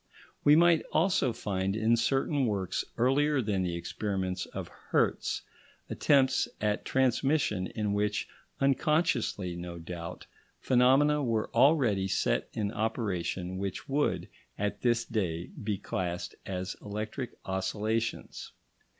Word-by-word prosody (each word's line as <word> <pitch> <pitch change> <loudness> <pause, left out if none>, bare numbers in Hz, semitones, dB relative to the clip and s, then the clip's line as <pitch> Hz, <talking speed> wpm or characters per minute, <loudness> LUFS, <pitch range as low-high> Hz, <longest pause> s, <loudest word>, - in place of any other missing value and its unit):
We 145 - +7
might 170 0 +5
also 160 -6 +2
find 95 -3 -2
in 110 +2 +3
certain 135 +3 +1
works 95 -4 -1
earlier 140 +4 +3
than 105 -5 0
the 90 -2 -1
experiments 95 +1 -3
of - - -6 0.2
Hertz - - +1 0.5
attempts 135 -3 +3
at 105 0 0
transmission 130 -6 +1
in 105 0 -2
which, 105 0 0 0.3
unconsciously 135 - +1
no 85 0 -6
doubt, 85 0 -7 0.3
phenomena 135 +4 +4
were 115 -4 0
already 120 -7 +4
set - - 0
in 105 -2 -1
operation 95 -5 -2
which 95 -1 -4
would, 145 +2 0 0.3
at 105 0 -2
this 120 -1 +2
day, 90 -7 -2
be 105 -1 -1
classed 90 -2 -3
as 95 -1 -3
electric 110 +5 -5
oscillations. 105 +4 -2
110 Hz, 115 wpm, -30 LUFS, 95-130 Hz, 0.5 s, We